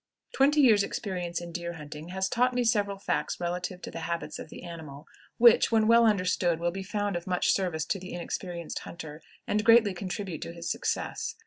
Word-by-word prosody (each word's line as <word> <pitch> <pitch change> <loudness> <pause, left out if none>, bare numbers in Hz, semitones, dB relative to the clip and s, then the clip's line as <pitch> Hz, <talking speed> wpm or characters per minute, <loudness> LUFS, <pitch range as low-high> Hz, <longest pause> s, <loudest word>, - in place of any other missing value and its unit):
Twenty 290 +3 +4
years' 220 -7 +6
experience 180 -4 -3
in 170 0 -7
deer 170 0 -4
hunting 150 0 -9
has 190 +1 -1
taught 250 +4 +1
me 250 - +2
several 205 -4 +1
facts 195 - -2
relative 180 +1 -3
to - - -6
the - - -6
habits 170 +1 -4
of - - -8
the - - -10
animal 160 -4 -9 0.3
which, 235 -1 +6
when 220 -1 +4
well 230 +1 +6
understood, 180 -4 +1
will 175 0 0
be 195 +2 -5
found 205 0 -2
of 175 +1 -5
much 180 -1 +2
service 175 -5 0
to 195 - -2
the 185 +1 -9
inexperienced 175 0 -5
hunter, 155 -2 -9 0.2
and 210 0 0
greatly 225 -3 +6
contribute 185 -2 -5
to 170 - -6
his 170 0 -4
success. 450 0 -2
185 Hz, 200 wpm, -28 LUFS, 170-210 Hz, 0.3 s, years